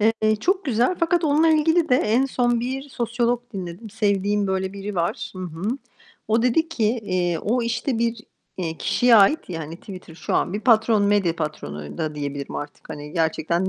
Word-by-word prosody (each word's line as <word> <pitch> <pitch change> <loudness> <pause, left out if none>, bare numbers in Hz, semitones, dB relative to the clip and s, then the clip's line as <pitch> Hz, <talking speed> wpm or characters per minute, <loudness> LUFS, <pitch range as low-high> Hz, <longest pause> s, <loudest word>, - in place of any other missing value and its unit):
Eee, 215 0 +2
çok 375 - 0
güzel. 245 +6 +2
Fakat 335 0 +2
onunla 310 +2 +4
ilgili 320 +1 +3
de 250 - +4
en 240 +3 +2
son 240 -3 +1
bir 265 +3 -4
sosyolog 240 -1 0
dinledim. 190 +2 -7
Sevdiğim 205 -1 +1
böyle 190 0 -1
biri 200 +1 -6
var. 170 -2 -2
Hı - - -7
hı. 170 -2 -7 0.7
O 225 +1 +3
dedi 285 +7 +2
ki, 290 -9 -1 0.2
eee, 180 -4 0
o, 240 +8 0
işte, 235 +1 -1
bir, 230 0 0 0.4
eee, 165 -3 -4
kişiye 245 -2 +4
ait, 210 +10 +6
yani, 165 -3 -4
hani, 160 +3 -8
Twitter 185 -3 -11
şu - - -3
an - - +1
bir 205 - -2
patron, 220 -2 +4
medya 200 -5 +2
patronu 75 - -5
da 155 -1 -2
diyebilirim 140 -1 -5
artık, 145 0 -8
hani, 150 0 -7
gerçekten 170 +2 0
210 Hz, 185 wpm, -23 LUFS, 175-245 Hz, 0.7 s, ait